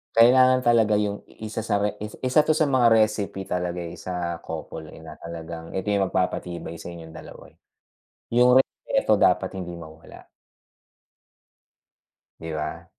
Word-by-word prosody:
Kailangan 130 +2 +6
talaga 115 -3 +4
'yung 105 -1 -2
isa 110 0 -7
sa 110 -2 -1
re 105 - -2
is 105 0 -7
isa 130 +3 +3
'to 155 +1 +3
sa 155 - +3
mga 125 -3 +4
recipe 110 -3 +2
talaga, 90 -1 -3
eh, 85 - -8
sa 85 -2 -4
couple, 80 -1 -7
eh, 80 - -13
na 80 -1 -11
talagang 85 0 -8
ito 95 +2 -1
'yung 100 -1 +2
magpapatibay 85 -3 -3
sa - - -9
inyong 85 -2 -9
dalawa, - - -12
eh, - - -33 0.7
'yung 125 +1 +5
respeto 130 - +1
dapat - - +3
hindi 90 -1 -6
mawala. 80 -1 -13 2.2
Di 80 0 -6
ba? 75 0 -5
95 Hz, 150 wpm, -24 LUFS, 85-115 Hz, 2.2 s, Kailangan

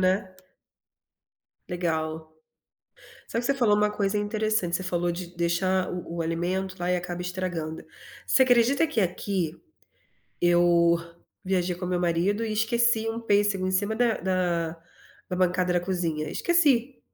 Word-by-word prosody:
né. 185 +1 +1 1.4
Legal. 160 -3 -3 0.9
Só 230 - -3
que - - -8
você 275 - +3
falou 235 -6 +3
uma 210 0 +2
coisa 205 0 -1
interessante, 210 -4 0
você 185 - -5
falou 175 -1 -1
de 175 0 -7
deixar 185 +2 +1
o 175 -1 -6
o - - 0
alimento 185 +3 -2
lá 175 0 -1
e 180 - +2
acaba 175 0 -5
estragando. 175 -3 -4 0.4
Você 260 - +4
acredita 255 +6 +4
que 235 - -1
aqui, 180 -2 -2 0.8
eu 175 -1 +4 0.5
viajei 185 -1 0
com 180 +1 -5
meu 180 0 -1
marido 180 +6 +1
e 220 - -2
esqueci 225 0 +2
um 225 +1 -3
pêssego 205 -3 +1
em - - -1
cima 205 +3 0
da 235 -1 +2
da 170 -3 -1 0.5
da 180 - -2
bancada 180 0 +1
da 175 - +3
cozinha, 170 -4 -2
esqueci. 275 -7 +2
185 Hz, 145 wpm, -26 LUFS, 175-210 Hz, 1.4 s, Você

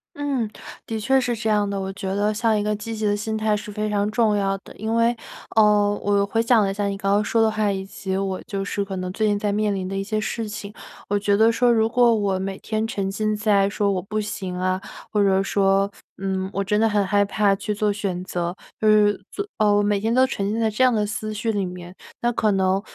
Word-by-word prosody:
嗯， 275 -6 -1 0.4
的 225 -1 -3
确 265 +4 +3
是 245 -1 -1
这 220 0 -2
样 205 -1 +2
的， 200 - -2
我 190 0 -4
觉 190 -1 -4
得 205 +2 +1
像 220 0 +1
一 - - -1
个 210 0 0
积 220 +2 -6
极 215 0 -3
的 205 - +2
心 220 +1 -3
态 215 -1 +1
是 210 0 -6
非 215 +1 -2
常 205 0 0
重 215 -1 +2
要 195 -1 0
的。 - - -15
因 220 +2 -3
为， 230 +1 +3 0.4
呃， 210 -1 +4
我 200 0 +2
回 225 +3 0
想 230 -2 +4
了 195 - 0
一 - - -3
下 205 0 -1
你 200 0 -2
刚 195 0 0
刚 210 +1 +3
说 225 +2 +1
的 225 - +4
话， 215 -1 0
以 190 0 -3
及 190 -1 -4
我 190 -1 -2
就 195 -1 -3
是 200 0 -2
可 195 -1 -6
能 185 0 -3
最 215 +2 +1
近 205 -1 +2
在 205 0 -1
面 210 0 +1
临 185 -1 -3
的 195 - -4
一 195 - -1
些 215 +2 -2
事 215 +1 -3
情。 205 0 -7 0.4
我 205 - +2
觉 200 0 +2
得 225 +1 +5
说 240 +1 +3
如 220 -1 +3
果 240 0 +4
我 200 -3 0
每 190 0 -4
天 220 0 -2
沉 195 -3 -2
浸 215 +1 -1
在 200 -2 +3
说 200 0 0
我 185 - -1
不 210 +3 -3
行 205 -4 -4
啊， 185 +1 0 0.3
或 210 -2 +2
者 195 0 +3
说， 195 0 +2 0.3
嗯， 190 0 -2
我 200 - -1
真 210 +2 +1
的 225 - +4
很 205 -2 +1
害 205 +1 +3
怕 200 0 +2
去 210 +2 -3
做 210 0 0
选 195 -4 -3
择。 175 -1 -3 0.3
呃， 215 -1 +5 0.2
做 405 - -4
哦， 210 -2 +3
我 205 - +3
每 205 -1 +1
天 225 +2 0
都 260 +1 +5
沉 200 -5 -2
浸 225 - -1
在 220 -1 +2
这 215 +5 +1
样 255 - +5
的 210 -1 +1
思 215 0 -4
绪 225 +2 -1
里 200 -3 -1
面， 180 0 -8 0.3
那 240 0 +2
可 220 -2 +1
能， 190 0 +2
205 Hz, 280 characters per minute, -23 LUFS, 195-220 Hz, 0.4 s, 得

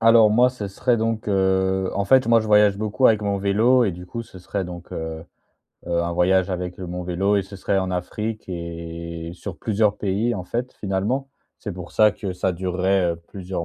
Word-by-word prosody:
Alors 115 -1 +6
moi, 120 +4 +5
ce 110 -5 -6
serait 120 +5 +1
donc 110 -1 -1
heu 95 -1 +1
en 100 - 0
fait, 130 +2 +4
moi 115 -1 +5
je 110 - -4
voyage 105 -2 +5
beaucoup 110 +5 +2
avec 110 -2 +3
mon 100 -1 0
vélo 110 +6 +3
et 100 - 0
du 90 +1 -9
coup, 115 +4 -5
ce 95 - -13
serait 95 +2 -3
donc, 85 0 -9
heu 80 0 -5 0.6
heu, 85 0 +1
un 85 0 -2
voyage 95 +2 +3
avec 90 0 -4
mon 90 -1 -5
vélo 95 +3 +1
et 100 - +2
ce 95 +1 -11
serait 95 +1 0
en 95 -1 -1
Afrique 105 +5 -3
et 85 -1 -6
sur 95 0 -7
plusieurs 105 -1 +1
pays, 105 +4 0
en 90 - -5
fait, 120 +6 -3
finalement. 105 +8 -2 0.3
C'est 105 - -5
pour 90 -1 -8
ça 105 -1 +5
que 100 -3 -5
ça 90 +1 -1
durerait, 90 0 +1
heu, - - -11
plusieurs 95 -3 -5
95 Hz, 210 wpm, -23 LUFS, 90-110 Hz, 0.6 s, Alors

